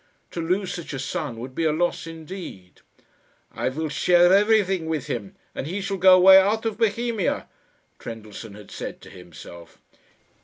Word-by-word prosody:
To 170 Hz, -, -4 dB
lose 180 Hz, +2 st, -1 dB
such 170 Hz, -4 st, -7 dB
a -, -, -3 dB
son 130 Hz, -1 st, -4 dB
would 125 Hz, +3 st, -8 dB
be 165 Hz, -, -2 dB
a 160 Hz, -, +3 dB
loss 170 Hz, +1 st, -1 dB
indeed. 165 Hz, -, -10 dB, 0.7 s
"I -, -, -2 dB
will 155 Hz, +4 st, -3 dB
share 175 Hz, +3 st, +4 dB
everything 195 Hz, -4 st, +3 dB
with 160 Hz, -4 st, -2 dB
him, 105 Hz, -5 st, -5 dB, 0.2 s
and -, -, -5 dB
he 185 Hz, +5 st, -3 dB
shall 195 Hz, 0 st, -3 dB
go 185 Hz, 0 st, +7 dB
away 190 Hz, +1 st, +8 dB
out 215 Hz, +4 st, +1 dB
of 220 Hz, -1 st, -3 dB
Bohemia," 225 Hz, -1 st, 0 dB, 0.5 s
Trendellsohn 110 Hz, -1 st, -9 dB
had 105 Hz, -1 st, -13 dB
said -, -, -7 dB
to -, -, -13 dB
himself. 85 Hz, -1 st, -13 dB
170 Hz, 165 wpm, -24 LUFS, 130-195 Hz, 0.7 s, away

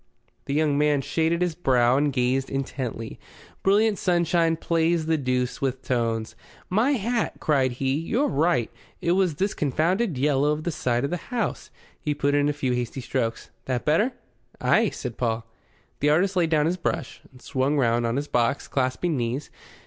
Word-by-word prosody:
The 140 Hz, -, -2 dB
young 150 Hz, -2 st, +2 dB
man 150 Hz, -2 st, +3 dB
shaded 165 Hz, +4 st, 0 dB
his 175 Hz, -2 st, 0 dB
brow 130 Hz, -6 st, +3 dB
and 145 Hz, +1 st, +2 dB
gazed 130 Hz, +1 st, 0 dB
intently. 130 Hz, -4 st, -4 dB, 0.4 s
Brilliant 205 Hz, +2 st, +3 dB
sunshine 170 Hz, -2 st, +2 dB
plays 165 Hz, 0 st, +1 dB
the 160 Hz, 0 st, +2 dB
deuce 125 Hz, -3 st, -1 dB
with 130 Hz, -1 st, -2 dB
tones. 115 Hz, -3 st, -1 dB, 0.4 s
"My 230 Hz, +9 st, +3 dB
hat!" 235 Hz, -1 st, -1 dB
cried 135 Hz, -5 st, +2 dB
he, 130 Hz, +2 st, -1 dB
"you're 235 Hz, -, 0 dB
right. 150 Hz, -4 st, +1 dB, 0.3 s
It 170 Hz, -2 st, 0 dB
was 180 Hz, -3 st, +2 dB
this 195 Hz, +6 st, 0 dB
confounded 165 Hz, -, 0 dB
yellow 145 Hz, +2 st, +2 dB
of 155 Hz, +1 st, -4 dB
the 170 Hz, -, -1 dB
side 120 Hz, -5 st, 0 dB
of 140 Hz, -, -1 dB
the 175 Hz, -, -5 dB
house." 225 Hz, -, -2 dB, 0.3 s
He 150 Hz, -1 st, -2 dB
put 145 Hz, 0 st, +1 dB
in 145 Hz, 0 st, +3 dB
a -, -, +2 dB
few 140 Hz, -3 st, -2 dB
hasty 125 Hz, +2 st, -3 dB
strokes. 115 Hz, -2 st, -3 dB
"That 125 Hz, -2 st, -2 dB
better?" 210 Hz, -, +2 dB, 0.5 s
"Ay," 185 Hz, -, +3 dB
said 125 Hz, -3 st, -6 dB
Paul. 115 Hz, -2 st, -1 dB, 0.5 s
The 145 Hz, -, +2 dB
artist 185 Hz, +6 st, +2 dB
laid 170 Hz, -3 st, +2 dB
down 150 Hz, -2 st, +3 dB
his 175 Hz, +3 st, 0 dB
brush, 160 Hz, -5 st, -3 dB
and 130 Hz, -, -17 dB
swung 135 Hz, +3 st, 0 dB
round 120 Hz, -3 st, +2 dB
on 115 Hz, -, -1 dB
his 145 Hz, +2 st, -2 dB
box, 120 Hz, +2 st, 0 dB
clasping 135 Hz, +5 st, 0 dB
knees. 125 Hz, +3 st, -3 dB
145 Hz, 180 wpm, -25 LUFS, 130-170 Hz, 0.5 s, man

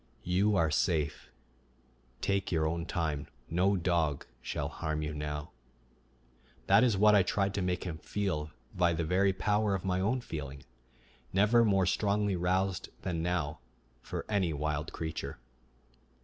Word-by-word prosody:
"You 100 Hz, +4 st, +2 dB
are 80 Hz, -4 st, +3 dB
safe. 75 Hz, -2 st, 0 dB, 0.9 s
Take 100 Hz, -1 st, 0 dB
your 80 Hz, -2 st, +2 dB
own 85 Hz, +1 st, -2 dB
time. 75 Hz, -4 st, -2 dB, 0.2 s
No 95 Hz, +4 st, +3 dB
dog 85 Hz, -5 st, 0 dB, 0.2 s
shall -, -, -3 dB
harm 80 Hz, -1 st, -3 dB
you 75 Hz, 0 st, -3 dB
now." 75 Hz, 0 st, -4 dB, 1.1 s
That -, -, +6 dB
is 115 Hz, -6 st, +3 dB
what 105 Hz, +2 st, +6 dB
I 100 Hz, -, +7 dB
tried 100 Hz, +1 st, 0 dB
to 100 Hz, -, -1 dB
make 90 Hz, 0 st, -1 dB
him 85 Hz, -3 st, -5 dB
feel 80 Hz, -6 st, -2 dB, 0.3 s
by 85 Hz, -2 st, +3 dB
the 85 Hz, +1 st, -1 dB
very 95 Hz, +4 st, +3 dB
power 105 Hz, +2 st, +1 dB
of 95 Hz, -, -4 dB
my 90 Hz, -1 st, +1 dB
own 110 Hz, +7 st, +1 dB
feeling, 70 Hz, -, -6 dB, 0.7 s
never 105 Hz, +5 st, +5 dB
more 95 Hz, -4 st, +3 dB
strongly 100 Hz, +1 st, +1 dB
roused 90 Hz, +1 st, 0 dB
than 85 Hz, -3 st, -2 dB
now 80 Hz, -3 st, -1 dB, 0.4 s
for -, -, -5 dB
any 95 Hz, -6 st, +1 dB
wild 75 Hz, +1 st, -2 dB
creature. 80 Hz, -1 st, -5 dB
90 Hz, 150 wpm, -31 LUFS, 80-100 Hz, 1.1 s, I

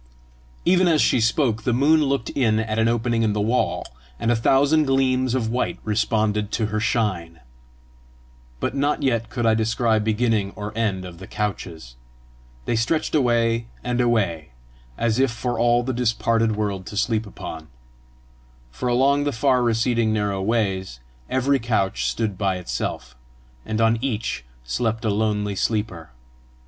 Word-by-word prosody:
Even 185 Hz, +1 st, +4 dB
as 160 Hz, -3 st, +3 dB
she 125 Hz, -, +3 dB
spoke 115 Hz, -1 st, +1 dB
the 120 Hz, +2 st, 0 dB
moon 150 Hz, +4 st, +4 dB
looked 135 Hz, -4 st, -1 dB
in 115 Hz, -6 st, +2 dB
at 110 Hz, 0 st, -2 dB
an 115 Hz, -, +3 dB
opening 115 Hz, 0 st, +1 dB
in 110 Hz, -2 st, +1 dB
the 105 Hz, -, -1 dB
wall, 115 Hz, +5 st, 0 dB, 0.3 s
and 115 Hz, -, +1 dB
a -, -, +3 dB
thousand 145 Hz, +6 st, +3 dB
gleams 130 Hz, -2 st, +1 dB
of 115 Hz, -3 st, -1 dB
white 125 Hz, -, -1 dB
responded 105 Hz, -1 st, 0 dB
to 110 Hz, -, 0 dB
her 110 Hz, -, +1 dB
shine. 95 Hz, -8 st, -1 dB, 1.2 s
But -, -, -2 dB
not 145 Hz, +2 st, 0 dB
yet 115 Hz, -4 st, 0 dB
could 120 Hz, -1 st, -2 dB
I 110 Hz, -, +4 dB
descry 110 Hz, 0 st, +1 dB
beginning 110 Hz, -2 st, 0 dB
or 105 Hz, 0 st, -6 dB
end 100 Hz, -5 st, -1 dB
of 85 Hz, -2 st, -10 dB
the 95 Hz, -, -10 dB
couches. 85 Hz, -, -5 dB, 0.7 s
They -, -, 0 dB
stretched 115 Hz, +8 st, 0 dB
away 115 Hz, -4 st, +2 dB, 0.2 s
and 125 Hz, 0 st, 0 dB
away, 95 Hz, -, 0 dB, 0.4 s
as 115 Hz, +1 st, 0 dB
if 135 Hz, 0 st, +3 dB
for 120 Hz, +1 st, -3 dB
all 120 Hz, 0 st, +3 dB
the 130 Hz, +1 st, -2 dB
disparted 115 Hz, -2 st, +1 dB
world 100 Hz, -3 st, -3 dB
to 105 Hz, -, -7 dB
sleep 110 Hz, -1 st, 0 dB
upon. 80 Hz, -4 st, -8 dB, 1.0 s
For 125 Hz, -, -3 dB
along 140 Hz, +4 st, +3 dB
the 145 Hz, -, +1 dB
far 125 Hz, +1 st, +2 dB
receding 115 Hz, -1 st, +1 dB
narrow 105 Hz, -2 st, -1 dB
ways, 95 Hz, -, -1 dB, 0.3 s
every 135 Hz, +1 st, +2 dB
couch 95 Hz, -, 0 dB
stood 95 Hz, -, -2 dB
by 95 Hz, -3 st, +1 dB
itself, 65 Hz, -7 st, -4 dB, 0.5 s
and 110 Hz, 0 st, -2 dB
on 115 Hz, 0 st, +3 dB
each 110 Hz, -, -2 dB, 0.2 s
slept 115 Hz, -, -2 dB
a 110 Hz, -, +2 dB
lonely 105 Hz, -1 st, 0 dB
sleeper. 95 Hz, -7 st, -2 dB
115 Hz, 155 wpm, -23 LUFS, 105-120 Hz, 1.2 s, Even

